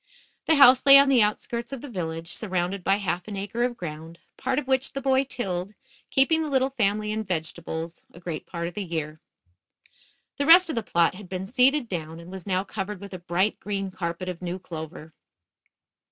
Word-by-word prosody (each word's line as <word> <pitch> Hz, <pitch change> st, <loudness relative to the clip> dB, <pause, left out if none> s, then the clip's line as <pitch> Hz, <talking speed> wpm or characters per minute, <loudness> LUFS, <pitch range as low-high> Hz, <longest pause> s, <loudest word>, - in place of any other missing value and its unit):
The 320 Hz, -, +5 dB
house 260 Hz, -3 st, +7 dB
lay 275 Hz, 0 st, +10 dB
on 280 Hz, 0 st, +6 dB
the 255 Hz, -4 st, +5 dB
outskirts 235 Hz, +3 st, -1 dB
of 270 Hz, -3 st, -6 dB
the 290 Hz, -, -8 dB
village, 165 Hz, -6 st, -5 dB
surrounded 185 Hz, -2 st, -2 dB
by 195 Hz, +3 st, +3 dB
half 180 Hz, -2 st, -3 dB
an 205 Hz, -2 st, -5 dB
acre 200 Hz, +4 st, -4 dB
of 245 Hz, -1 st, -1 dB
ground, 160 Hz, 0 st, -7 dB, 0.2 s
part 260 Hz, 0 st, -2 dB
of 295 Hz, -, -1 dB
which 265 Hz, 0 st, 0 dB
the 275 Hz, -, -3 dB
boy 265 Hz, 0 st, +2 dB
tilled, 195 Hz, -6 st, -4 dB, 0.3 s
keeping 320 Hz, +4 st, +3 dB
the 310 Hz, -, -2 dB
little 265 Hz, -1 st, +1 dB
family 210 Hz, -3 st, 0 dB
in 220 Hz, 0 st, -2 dB
vegetables 165 Hz, -2 st, -4 dB
a -, -, -14 dB
great 170 Hz, -3 st, -6 dB
part 170 Hz, 0 st, -4 dB
of 175 Hz, -, -7 dB
the 205 Hz, -, -4 dB
year. 155 Hz, -3 st, -5 dB, 1.2 s
The 285 Hz, -, -1 dB
rest 350 Hz, +1 st, +8 dB
of 310 Hz, -, -2 dB
the 230 Hz, -, 0 dB
plot 170 Hz, -5 st, +2 dB
had 190 Hz, -1 st, -11 dB
been 185 Hz, 0 st, -4 dB
seeded 255 Hz, +4 st, +3 dB
down, 165 Hz, -4 st, -5 dB
and 170 Hz, +2 st, -11 dB
was 190 Hz, -1 st, -9 dB
now 185 Hz, -1 st, +1 dB
covered 200 Hz, 0 st, -5 dB
with 200 Hz, 0 st, -10 dB
a 185 Hz, -, -6 dB
bright 175 Hz, +4 st, 0 dB
green 195 Hz, -2 st, -3 dB
carpet 170 Hz, 0 st, -4 dB
of 180 Hz, -1 st, -5 dB
new 180 Hz, 0 st, -3 dB
clover. 160 Hz, -2 st, -9 dB
195 Hz, 205 wpm, -25 LUFS, 175-250 Hz, 1.2 s, lay